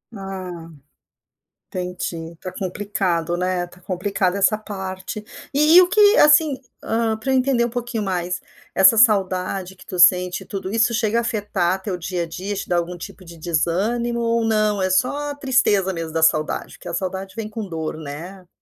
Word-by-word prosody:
Ah 185 -4 -7 1.0
entendi, 180 -2 -4
está 185 +2 -8
complicado, 180 -3 -2
né, 180 0 0
está 175 +1 -17
complicado 185 +1 -1
essa 200 +2 +3
parte. 190 -1 -6 0.3
E 300 +4 +5
e 365 - +11
o - - +1
que, 420 +3 +5
assim, 300 -2 +5 0.2
hã, 225 0 0
para 220 +5 -3
eu - - +3
entender 255 -2 +2
um 235 - 0
pouquinho 240 -1 -3
mais, 180 -2 -2 0.3
essa 190 +4 +6
saudade 190 -4 +2
que 185 - -16
tu 180 - -6
sente 180 +1 +5
tudo, 190 0 -5
isso 230 +1 +2
chega 225 0 +1
a - - +1
afetar 205 -5 -1
teu 190 -1 -3
dia 180 0 -3
a - - -3
dia, 190 +5 -5
te 195 - -5
dá 175 - 0
algum 175 +1 -2
tipo 190 +2 -10
de 170 -1 -12
desânimo 195 +9 0
ou 230 0 +1
não, 215 -2 +1
é 185 - +1
só 285 +9 0
tristeza 250 -9 +2
mesmo 165 -2 -5
da 160 0 0
saudade? 155 -1 +1
Porque - - -12
a - - -6
saudade 190 +1 -4
vem 225 -2 -4
com 215 -1 -6
dor, 160 -2 -4
né? 165 +5 -8
190 Hz, 180 wpm, -21 LUFS, 180-225 Hz, 1.0 s, e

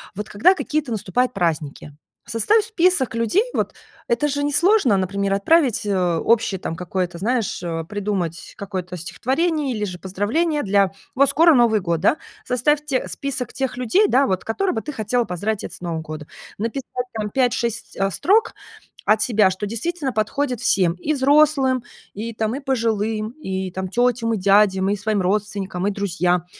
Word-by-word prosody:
вот 210 +2 -5
когда 220 - +4
какие-то 300 -7 -2
наступают 245 +5 0
праздники, 155 -5 -2 0.4
составь 415 - +2
список 360 - +2
людей 230 - +2
вот. - - -1 0.3
Это 235 +5 +1
же 285 0 -1
несложно, 290 - +3
например, 195 +1 -1
отправить, 255 +4 +3
э, 180 -4 +1
общее 215 -2 +1
какое-то, 175 +1 -3
знаешь, 230 -2 -1
э, 165 -1 -3
придумать 195 -5 -3
какое-то 185 -3 -5
стихотворение 275 - -1
или 210 - -3
же 180 -2 -6
поздравление 255 - -1
для 200 -1 +2 0.2
вот 275 +1 +4
скоро 330 +1 +5
Новый 225 -4 +4
год, 170 -2 -1
да? 250 - +3 0.3
Составь 295 +4 +1
те 270 -3 -1
список 270 -4 -4
тех 265 -2 -3
людей, 255 - +3
да, 270 +2 +3
вот, 185 -1 -1
которых 370 +11 -1
бы 220 - -1
ты 300 - -6
хотела 240 0 0
поздравить 205 +3 -3
это 175 - -7
с - - -14
Новым 165 -2 -3
годом. 155 -1 -8 0.3
Написать 245 +2 -3
там 215 -2 -3
5-6 240 -3 -1 0.2
строк 445 - +2 0.5
от 215 +1 +3
себя, 215 -5 +3
что 190 +3 -4
действительно 275 - -3
подходит 245 +4 -1
всем: 180 -3 +2
и 235 +12 -2
взрослым, 275 -2 +3 0.3
и 225 +3 -5
там, 220 +2 -1
и - - -4
пожилым, 225 -4 -1
и 190 -8 -3
там 190 +1 -4
тетям, 235 +2 +1
и - - 0
дядям, 195 0 +3
и 205 - +1
своим 205 0 -1
родственникам, 195 -1 -2
и - - +1
друзьям. 180 -3 0
220 Hz, 165 wpm, -21 LUFS, 190-265 Hz, 0.5 s, скоро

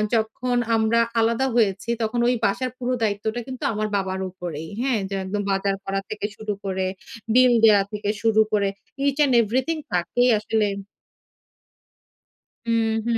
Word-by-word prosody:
যখন 235 +3 -1 0.2
আমরা 225 +1 +2 0.2
আলাদা 230 +3 +2
হয়েছি 210 -1 +1
তখন 225 +2 -1
ওই 250 - +3
বাসার 245 +5 0
পুরো 255 0 -2
দায়িত্বটা 215 +3 -1
কিন্তু 255 -1 -7
আমার 215 0 -1
বাবার 190 -1 -2
উপরেই, 170 -4 -6
হ্যাঁ? 255 -4 +1
যে 195 - -3
একদম 205 +2 -2
বাজার 195 0 0
করা 195 0 -1
থেকে 210 -1 -4
শুরু 215 -1 -3
করে, 190 -1 -1 0.5
বিল 250 0 +6
দেওয়া 205 -2 +6
থেকে 205 -1 -3
শুরু 220 -1 +4
করে 200 -1 +2 0.4
ইচ 275 - +1
অ্যান্ড 285 -3 +4
এভরিথিং 255 +9 0 0.2
তাকেই 210 +8 +2
আসলে 215 0 0 2.0
হুম, 230 -1 +1 0.2
হুম, 235 -1 +1
220 Hz, 150 wpm, -23 LUFS, 200-245 Hz, 2.0 s, বিল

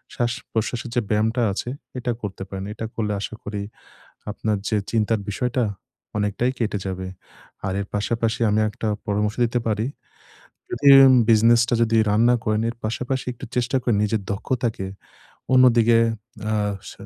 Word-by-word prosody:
শ্বাস-প্রশ্বাসের 120 0 -2
যে 120 - +3
ব্যায়ামটা 110 +3 +1
আছে 105 +5 -4 0.3
এটা 120 - -1
করতে 95 -2 -5
পারেন। 95 0 -5
এটা 110 - -5
করলে 105 -2 -1
আশা 110 - -5
করি 105 -1 -4 0.7
আপনার 105 0 -1
যে 110 - +1
চিন্তার 110 -1 +1
বিষয়টা 125 +4 0 0.5
অনেকটাই 105 +4 0
কেটে 105 -3 -1
যাবে। 95 0 -4 0.6
আর 95 - -1
এর 100 - -4
পাশাপাশি 115 +2 -1
আমি 105 +1 +2
একটা 110 - -5 0.2
পরামর্শ 105 +1 0
দিতে 120 +1 0
পারি। 110 +1 0 0.8
যদি 140 +4 +2 0.2
উম 130 -1 +7
বিজনেস 115 +1 +6
টা - - +2
যদি 115 0 +2
রান 105 +2 +2
না - - +5
করেন। 110 +1 +1
এর - - -8
পাশাপাশি 125 +4 -2
একটু 120 - -10
চেষ্টা 125 +2 +1
করেন 115 -4 +1
নিজের 105 0 0
দক্ষতাকে 115 -2 -2 0.7
অন্যদিকে 120 -3 +6 0.5
আ - - +1 0.4
স - - -9
110 Hz, 155 wpm, -23 LUFS, 105-120 Hz, 0.8 s, উম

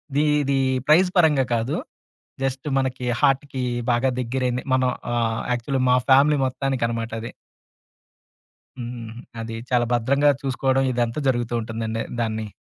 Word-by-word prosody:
The 145 - +3 0.2
ఇది 140 -1 0 0.3
praise 180 +4 +5
పరంగా 155 -6 +5
కాదు. 115 +4 -1 0.7
జస్ట్ 135 +1 -2
మనకి 130 -1 -1 0.2
హార్ట్‌కి 135 -1 +1 0.3
బాగా 120 +2 +2
దగ్గరైంది 125 0 -1
మనం 130 -1 +2 0.2
ఆహ్, 115 -1 0
యాక్చువల్ 125 +3 -2
మా 125 - +6
ఫ్యామిలీ 145 +3 +6
మొత్తానికనమాట 120 -4 -2
అది. 115 - -7 1.5
హ్మ్. 120 -2 -6 0.3
అది 115 0 -5
చాలా 120 -1 +2
భద్రంగా 140 +5 +3
చూసుకోవడం 135 0 +1
ఇదంతా 120 +2 -1
జరుగుతూ 120 -2 -1
ఉంటుందండి 115 0 -3 0.2
దాన్ని. 110 -1 -2
125 Hz, 125 wpm, -23 LUFS, 115-135 Hz, 1.5 s, మా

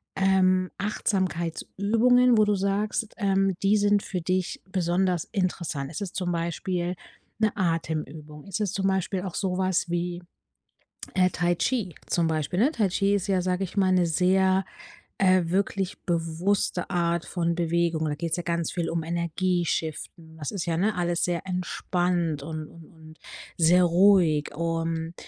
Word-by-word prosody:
ähm, 185 -1 +3
Achtsamkeitsübungen, 210 +5 +1
wo 215 - +5
du 210 -1 +2
sagst, 205 +3 -1
ähm, 195 -2 +2
die 205 +2 +4
sind 205 0 +3
für 180 -2 -4
dich 185 +1 -1
besonders 180 -1 0
interessant? 175 -8 -2
Ist 165 - -6
es 195 -3 -5
zum 180 -1 -2
Beispiel 175 +1 -2 0.4
'ne 215 -1 +3
Atemübung? 155 -4 -3
Ist 195 +1 -4
es 205 -4 -1
zum 195 0 0
Beispiel 190 0 0
auch 185 -3 -6
sowas 185 -2 0
wie, 175 +1 -2 0.9
äh, 185 -1 +4
Tai 175 0 0
Chi 215 -8 -1
zum 170 -2 +1
Beispiel, 160 +3 -1
ne? 260 +6 +4
Tai 220 -10 +1
Chi 195 +2 +1
ist 195 - -3
ja, 190 -2 +1
sage 185 +1 0
ich 190 - -9
mal, 190 -2 +3
'ne 180 -2 +3
sehr, 190 +3 +2 0.5
äh, 185 -2 +4
wirklich 190 +1 -1
bewusste 175 +2 -1
Art 170 -1 0
von 170 -2 -1
Bewegungen, 170 -1 0
da 145 - -3
geht's 165 +1 -2
ja 175 - -3
ganz 170 -1 -2
viel 170 -2 -2
um 165 -1 -2
Energie 170 +2 -1
shiften. 160 0 -4
Das 150 -3 -4
ist 190 -3 -4
ja, 165 -1 0
ne, 200 +3 +1
alles 175 -1 0
sehr 175 +1 -2
entspannt 175 -3 -1
und 155 +1 -5
und 165 -1 -14
und 160 -1 -16 0.4
sehr 175 +2 +5
ruhig, 175 -4 +4
und 165 0 -2
180 Hz, 160 wpm, -26 LUFS, 165-190 Hz, 0.9 s, wo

